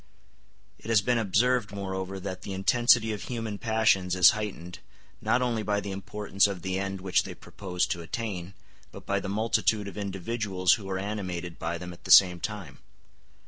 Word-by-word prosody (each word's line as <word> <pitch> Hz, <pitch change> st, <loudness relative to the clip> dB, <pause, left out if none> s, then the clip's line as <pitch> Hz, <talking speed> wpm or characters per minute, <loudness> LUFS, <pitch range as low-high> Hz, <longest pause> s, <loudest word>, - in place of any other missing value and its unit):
It 110 Hz, -, -10 dB
has 115 Hz, -2 st, +5 dB
been 120 Hz, 0 st, +2 dB
observed, 115 Hz, +2 st, +1 dB
moreover, 95 Hz, -1 st, -4 dB
that 95 Hz, 0 st, -6 dB
the 95 Hz, -, -6 dB
intensity 115 Hz, +3 st, +3 dB
of 105 Hz, -, -6 dB
human 115 Hz, -4 st, -4 dB
passions 110 Hz, -5 st, +2 dB
is 90 Hz, +1 st, +8 dB
heightened, 95 Hz, -5 st, -6 dB, 0.4 s
not 120 Hz, +4 st, +2 dB
only 120 Hz, -3 st, 0 dB
by 105 Hz, 0 st, 0 dB
the 100 Hz, -1 st, -5 dB
importance 100 Hz, +1 st, 0 dB
of 95 Hz, -3 st, -6 dB
the 95 Hz, 0 st, -1 dB
end 95 Hz, -1 st, -4 dB
which 95 Hz, -1 st, +2 dB
they -, -, -8 dB
propose 90 Hz, -3 st, -3 dB
to 85 Hz, -, -3 dB
attain, 95 Hz, 0 st, -5 dB, 0.4 s
but -, -, -11 dB
by 100 Hz, 0 st, 0 dB
the 95 Hz, -, -5 dB
multitude 110 Hz, 0 st, +1 dB
of 100 Hz, -, -7 dB
individuals 95 Hz, -1 st, 0 dB
who 105 Hz, -4 st, -4 dB
are 95 Hz, -, -1 dB
animated 90 Hz, -4 st, -4 dB
by 85 Hz, +1 st, -2 dB
them 90 Hz, +1 st, -8 dB
at 85 Hz, -, -17 dB
the -, -, -8 dB
same 90 Hz, -2 st, +7 dB
time. 95 Hz, -9 st, -6 dB
100 Hz, 185 wpm, -27 LUFS, 95-110 Hz, 0.4 s, is